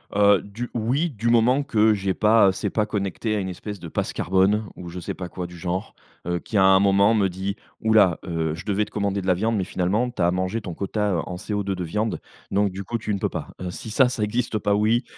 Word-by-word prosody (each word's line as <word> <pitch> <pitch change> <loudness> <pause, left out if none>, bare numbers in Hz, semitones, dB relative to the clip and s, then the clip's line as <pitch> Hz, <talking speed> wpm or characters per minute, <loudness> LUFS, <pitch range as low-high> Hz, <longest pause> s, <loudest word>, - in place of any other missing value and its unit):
Heu, 100 -2 +5
du, 110 +5 -7
oui, 125 +9 0
du 115 -4 -2
moment 120 +4 +4
que 110 -5 +3
j'ai 95 -2 -1
pas, 105 -1 +5
c'est 100 +2 -3
pas 105 +2 0
connecté 105 +1 -2
à - - 0
une 95 -1 -3
espèce 100 +2 -7
de 85 - -8
passe - - -2
carbone, 95 +4 +2
ou 90 - -8
je 90 +2 -7
sais 85 - -4
pas 90 -1 -7
quoi 90 +1 -5
du 90 0 -12
genre, 90 +5 -4 0.3
heu, 85 0 0
qui 105 - -3
à 95 - +5
un 95 0 +6
moment 100 +2 +4
me 100 -4 +2
dit: 95 +2 -4 0.3
«Ouh 110 0 +2
là, 95 -6 +5
heu, 80 -3 -1
je 80 - -9
devais 105 0 +1
te 105 - -18
commander 100 -1 -1
de 95 - -6
la 90 - +5
viande, 110 +6 0
mais 95 - 0
finalement, 95 +8 0
tu 120 - -5
as 85 0 +3
mangé 95 +5 -1
ton 90 -4 -6
quota, 100 +3 -1
heu, 85 - +1
en 90 - -5
CO2 105 +2 -3
de 90 - -4
viande, 105 +6 -2 0.3
donc 100 0 +2
du 95 +2 -6
coup 115 +5 -3
tu 110 -2 -3
ne 100 - -2
peux - - 0
pas.» - - -6
heu, 90 -1 -3
si 110 - -8
ça, 125 +3 +4
ça 120 -4 -2
existe 115 +1 -1
pas, 100 0 +1
oui. 110 +4 +2
100 Hz, 265 wpm, -24 LUFS, 95-110 Hz, 0.3 s, un